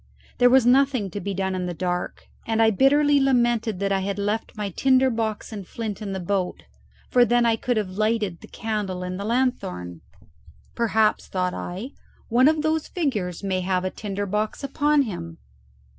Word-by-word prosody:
There 245 - +6
was 260 -1 +5
nothing 255 -5 +3
to 205 - -4
be 200 -1 -4
done 190 0 -1
in 180 -1 -2
the 175 - -4
dark, 180 0 -3 0.2
and 225 0 0
I 225 0 +5
bitterly 285 +5 +4
lamented 240 -5 +2
that 200 0 0
I 195 - +2
had 195 +1 -3
left 210 +2 -2
my 205 -2 -3
tinder 260 +5 +3
box 225 -1 -3
and 200 -4 -7
flint 220 -2 -5
in 205 -2 -4
the 190 - -3
boat, 185 0 -2 0.5
for 245 - +6
then 240 0 +3
I 230 -1 +3
could 245 +1 -1
have 205 -4 -1
lighted 210 -3 -1
the - - -12
candle 205 -5 -3
in 180 0 -4
the 200 - -5
lanthorn. 90 - -2 0.7
"Perhaps," 220 -2 +1
thought 180 -1 -1
I, 195 +10 -6 0.4
"one 245 +3 +5
of 310 0 +2
those 315 0 0
figures 210 - -2
may 190 -2 -1
have 185 0 0
a 185 - -1
tinder 205 -1 -4
box 210 +6 -2
upon 290 +1 +2
him." 170 - -6
215 Hz, 190 wpm, -24 LUFS, 190-245 Hz, 0.7 s, There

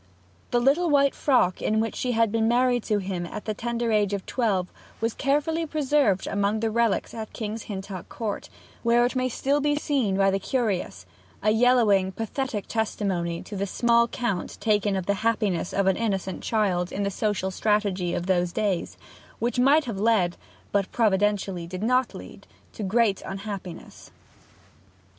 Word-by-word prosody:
The 240 - +2
little 290 +8 +3
white 280 -2 +4
frock 250 -10 +2
in 215 +1 +1
which 225 0 -1
she 250 -1 -1
had 225 -2 +2
been 225 0 +1
married 245 +1 +3
to 210 - +1
him 185 -3 -3
at 210 - -7
the 215 - -1
tender 235 +1 -2
age 210 -2 +2
of 200 -1 -3
twelve 200 -7 0 0.3
was 225 0 -1
carefully 300 +4 0
preserved 290 - +1
among 205 +2 0
the 225 0 0
relics 230 -2 +1
at 220 -2 -7
King's 220 0 -5
Hintock 195 -2 -6
Court, 220 -4 -4 0.3
where 235 +1 +4
it 250 - -2
may 255 0 +1
still 280 +4 0
be 295 +1 +2
seen 265 -10 0
by 195 0 +4
the 195 - 0
curious 195 - -2 0.4
a 215 - +4
yellowing, 220 -5 +4
pathetic 225 -1 -3
testimony 190 -6 -2
to 205 - -8
the 200 +1 -2
small 235 +3 +3
count 230 -7 -3
taken 210 -2 +1
of 190 -2 -2
the 200 - +2
happiness 210 -6 0
of 195 - +1
an 190 - +3
innocent 195 -4 -2
child 185 -5 0
in 200 - -2
the 200 - -1
social 200 -2 -1
strategy 195 -3 0
of 175 - -3
those 180 -2 +1
days, 195 -2 -1 0.4
which 240 +2 -1
might 285 +5 +5
have 225 -6 -4
led, 200 -5 +2 0.4
but 200 -2 0
providentially 200 -5 +1
did 185 +3 -6
not 255 +2 +1
lead, - - -11 0.3
to - - -8
great 205 0 +2
unhappiness. 195 -2 -7
215 Hz, 170 wpm, -25 LUFS, 195-240 Hz, 0.4 s, might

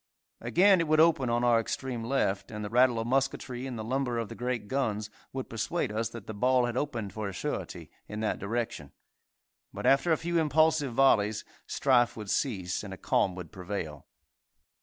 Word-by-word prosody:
Again 190 +1 +4
it 165 - -1
would 155 0 +3
open 155 -6 +4
on 120 +1 +1
our 120 -1 +5
extreme 120 +1 -3
left, 100 -6 0
and 105 -1 -5
the 105 - -6
rattle 125 0 +4
of 115 - -2
musketry 130 0 -1
and 125 -3 -5
the 110 - -4
lumber 125 +1 -1
of 115 -3 -3
the - - -7
great 125 -3 -3
guns 110 -5 -1 0.2
would 130 -1 -5
persuade 115 +5 -2
us 110 +1 -1
that 115 -3 -9
the 110 - -6
ball 125 +4 +3
had 120 0 -3
opened 120 -8 -3
for 105 -2 -3
a - - -7
surety - - -5 0.2
in 105 - -6
that 110 - -1
direction, 100 - -3 0.8
but, - - -6
after 135 +5 +4
a 160 - +4
few 170 0 0
impulsive 155 -3 +2
volleys, 110 -6 +3 0.2
strife 125 -4 +2
would 105 -2 -5
cease, 95 -10 -1
and 100 -2 -6
a - - -19
calm 95 0 +1
would 90 -4 -8
prevail. 90 -6 -6
120 Hz, 195 wpm, -29 LUFS, 105-135 Hz, 0.8 s, our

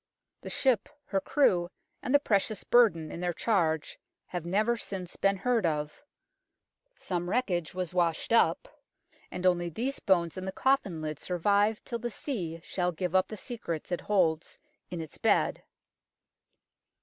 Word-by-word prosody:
The - - -7
ship, 255 -7 +2 0.2
her 195 -1 -1
crew, 180 -12 +2 0.3
and 265 - -3
the 285 - +7
precious 210 -4 0
burden 170 -11 +4
in 170 - -6
their 175 -1 0
charge 160 -8 0 0.3
have 175 -2 -5
never 215 +6 +2
since 190 -5 -5
been 195 0 +2
heard 235 +2 +1
of 150 -3 -2 0.9
(some 175 -1 -3
wreckage 180 -9 -1
was 180 -2 -3
washed 170 +3 +1
up) 235 - +3 0.6
and 180 - -5
only 175 -1 +3
these 245 - -3
bones 175 -3 +1
and 185 0 -5
the - - -1
coffin 195 -9 +1
lid 155 -1 -4
survive 205 +4 +1
till 235 - -4
the 240 +1 -3
sea 180 - -4
shall 180 -1 -1
give 180 +1 -3
up 185 0 +4
the 215 - -7
secrets 185 - -5
it 175 - -1
holds 170 -6 +1 0.3
in 175 -1 -4
its 160 - -9
bed. - - +2
185 Hz, 155 wpm, -29 LUFS, 170-220 Hz, 0.9 s, the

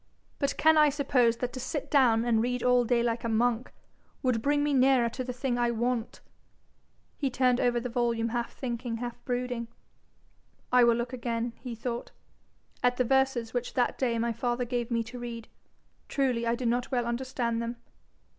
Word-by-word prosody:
'But 280 - -1
can 315 0 +5
I 300 -1 +6
suppose 260 -5 +2
that 245 0 -3
to 255 - -5
sit 270 +3 -4
down 240 -5 +4
and 225 -2 +3
read 250 +1 -1
all 250 -1 +4
day 235 0 +2
like 235 0 -1
a 230 - -1
monk, 235 +2 +1 0.5
would 250 -4 +1
bring 290 +3 +2
me 295 -1 +1
nearer 260 -2 +4
to 255 - -5
the 250 - -4
thing 250 -1 -2
I 240 0 +2
want?' 235 0 -2 1.0
He 275 - +1
turned 250 -1 +2
over 240 -1 +2
the 245 - -4
volume 235 -1 0
half 235 0 -2
thinking, 240 -2 -4
half 240 0 -6
brooding. 245 -2 -2 1.0
'I 250 -1 +6
will 235 -1 +4
look 240 +2 -3
again,' 235 -1 -2
he 245 -3 -6
thought, 235 +1 -4 0.7
'at 245 0 +2
the 255 - +2
verses 265 -3 +1
which 245 0 -3
that 245 -1 +1
day 240 -3 +1
my 230 0 0
father 240 +2 -1
gave 240 0 -2
me 230 -1 0
to 235 +2 -9
read. 235 -2 -6 0.6
Truly 250 -4 0
I 230 - +2
did 245 0 -2
not 245 +1 0
well 245 -3 0
understand 235 -1 -2
them.' 235 +1 -3
245 Hz, 190 wpm, -29 LUFS, 235-255 Hz, 1.0 s, I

